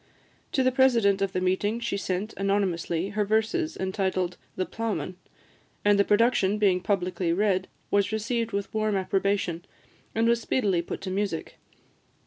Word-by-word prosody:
To 265 Hz, -, +3 dB
the 255 Hz, -, +3 dB
president 235 Hz, -7 st, +3 dB
of 195 Hz, -1 st, +1 dB
the 185 Hz, -, -1 dB
meeting 190 Hz, +5 st, 0 dB
she 235 Hz, -4 st, -2 dB
sent, 200 Hz, +2 st, -2 dB
anonymously, 195 Hz, -3 st, 0 dB
her 210 Hz, +1 st, 0 dB
verses 220 Hz, -, 0 dB
entitled 190 Hz, -2 st, -1 dB, 0.2 s
"The 185 Hz, -, -1 dB
Ploughman;" 220 Hz, -4 st, -3 dB, 0.7 s
and 205 Hz, -1 st, +5 dB
the -, -, +6 dB
production 210 Hz, -1 st, +3 dB
being 190 Hz, -4 st, +3 dB
publicly 180 Hz, -3 st, 0 dB
read, 190 Hz, 0 st, +1 dB, 0.2 s
was 200 Hz, 0 st, +2 dB
received 230 Hz, +1 st, -1 dB
with 200 Hz, -1 st, -3 dB
warm 215 Hz, -1 st, +1 dB
approbation, 190 Hz, -2 st, 0 dB, 0.5 s
and 225 Hz, +1 st, +2 dB
was 235 Hz, 0 st, +3 dB
speedily 200 Hz, -8 st, +1 dB
put 170 Hz, -, -6 dB
to 190 Hz, -1 st, -4 dB
music. 195 Hz, -4 st, -3 dB
200 Hz, 150 wpm, -27 LUFS, 185-220 Hz, 0.7 s, the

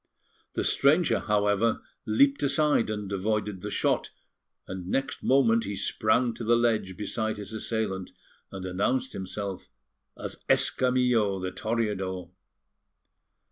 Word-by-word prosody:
The -, -, 0 dB
stranger, 155 Hz, +5 st, +3 dB
however, 105 Hz, +1 st, +1 dB, 0.2 s
leaped 140 Hz, +6 st, +4 dB
aside 145 Hz, -3 st, +2 dB
and 105 Hz, -2 st, -4 dB
avoided 105 Hz, -1 st, -1 dB
the 105 Hz, -, -4 dB
shot, -, -, 0 dB, 0.6 s
and 95 Hz, -1 st, -6 dB
next 135 Hz, +8 st, -1 dB
moment 115 Hz, -4 st, +3 dB
he 100 Hz, -, -3 dB
sprang 115 Hz, +4 st, +1 dB
to 115 Hz, -, -7 dB
the 120 Hz, +1 st, +4 dB
ledge 110 Hz, -6 st, +1 dB
beside 110 Hz, +1 st, -2 dB
his 105 Hz, +1 st, -7 dB
assailant, 110 Hz, -4 st, -2 dB, 0.4 s
and 95 Hz, -1 st, -6 dB
announced 125 Hz, +8 st, 0 dB
himself 95 Hz, 0 st, -5 dB, 0.5 s
as -, -, -6 dB
Escamillo, 125 Hz, -5 st, +3 dB
the 95 Hz, 0 st, -3 dB
Toreador. 95 Hz, -5 st, -2 dB
110 Hz, 120 wpm, -27 LUFS, 100-125 Hz, 0.6 s, leaped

